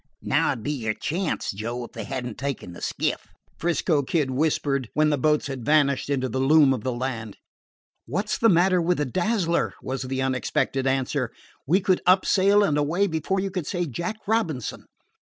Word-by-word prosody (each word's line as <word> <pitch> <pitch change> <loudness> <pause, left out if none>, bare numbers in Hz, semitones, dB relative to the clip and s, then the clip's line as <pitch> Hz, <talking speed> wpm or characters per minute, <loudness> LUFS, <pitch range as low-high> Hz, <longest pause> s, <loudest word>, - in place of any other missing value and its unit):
"Now - - +2
'd 110 - -9
be 145 - -1
your 110 -7 -2
chance, 175 +2 -2
Joe, 115 +5 -4
if 120 - -9
they - - -6
had 130 -2 -4
n't 120 -3 -5
taken 135 -10 -4
the - - -11
skiff," - - -2 0.3
'Frisco 165 -2 +1
Kid 140 -1 0
whispered, 140 -3 0
when 150 0 +3
the - - +3
boats 150 +2 +2
had 135 -3 -5
vanished 140 0 +2
into 130 -2 0
the 130 +2 -3
loom 140 0 +5
of 120 -5 -4
the 130 - -1
land. 120 -4 -4 0.7
"What 200 +3 -2
's - - -1
the 230 - +5
matter 180 +1 +4
with 175 +1 +1
the 150 - 0
Dazzler?" 175 - 0
was 130 0 -4
the 130 0 -2
unexpected 130 +1 0
answer. 130 -2 0 0.4
"We 180 +7 +3
could 185 -1 +2
up 185 +1 +5
sail 200 +2 +4
and 150 -7 +2
away 165 +7 +1
before 170 +2 -1
you 195 0 -3
could 180 -5 -4
say 175 -2 -1
Jack 170 - -4
Robinson." 175 - -1
145 Hz, 195 wpm, -25 LUFS, 130-175 Hz, 0.7 s, loom